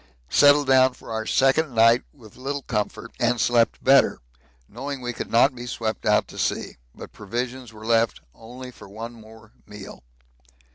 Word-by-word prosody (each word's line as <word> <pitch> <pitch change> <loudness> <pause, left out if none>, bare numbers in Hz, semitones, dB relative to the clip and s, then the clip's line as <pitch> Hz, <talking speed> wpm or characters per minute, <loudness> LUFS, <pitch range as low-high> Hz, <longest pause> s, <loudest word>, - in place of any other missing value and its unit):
Settled 145 0 +5
down 130 -1 +4
for - - -12
our 110 0 -3
second 135 0 +2
night 115 +2 +5
with 110 -7 -17
little 140 +2 -5
comfort, 110 +1 -4
and 120 0 +1
slept 115 +1 +2
better, 135 +1 +5 0.5
knowing 135 +5 -6
we 120 -1 -5
could - - -7
not 125 +4 +4
be 120 0 -9
swept 110 -3 -4
out - - +3
to - - -11
sea, - - -2 0.2
but - - -11
provisions 120 +3 -5
were 110 0 -12
left 115 -1 +1
only 125 +3 -11
for 100 - -15
one 115 +4 -8
more 110 -1 -16 0.2
meal. 105 -2 -11
120 Hz, 170 wpm, -23 LUFS, 110-130 Hz, 0.5 s, Settled